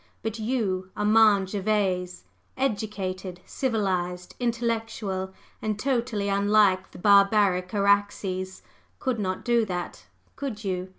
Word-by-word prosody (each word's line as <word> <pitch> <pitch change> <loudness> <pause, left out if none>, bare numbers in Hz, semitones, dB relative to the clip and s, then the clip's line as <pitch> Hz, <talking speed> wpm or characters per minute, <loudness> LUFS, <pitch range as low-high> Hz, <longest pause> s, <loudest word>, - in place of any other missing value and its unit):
But 225 +1 -3
you, 210 -6 -1
Armand 210 -2 +4
Gervase, 190 - -1 0.3
educated, 195 -7 -3
civilized, 185 -8 -2
intellectual, 225 -5 -2 0.3
and 215 -1 -2
totally 235 -4 -1
unlike 200 -1 +3
the - - -13
barbaric 200 -2 +4
Araxes, 200 -2 0 0.3
could 255 -4 -2
not 185 -2 -3
do 240 -1 +3
that, 180 -3 -5 0.3
could 240 -7 -5
you? 185 -1 -3
200 Hz, 105 wpm, -26 LUFS, 185-220 Hz, 0.3 s, Armand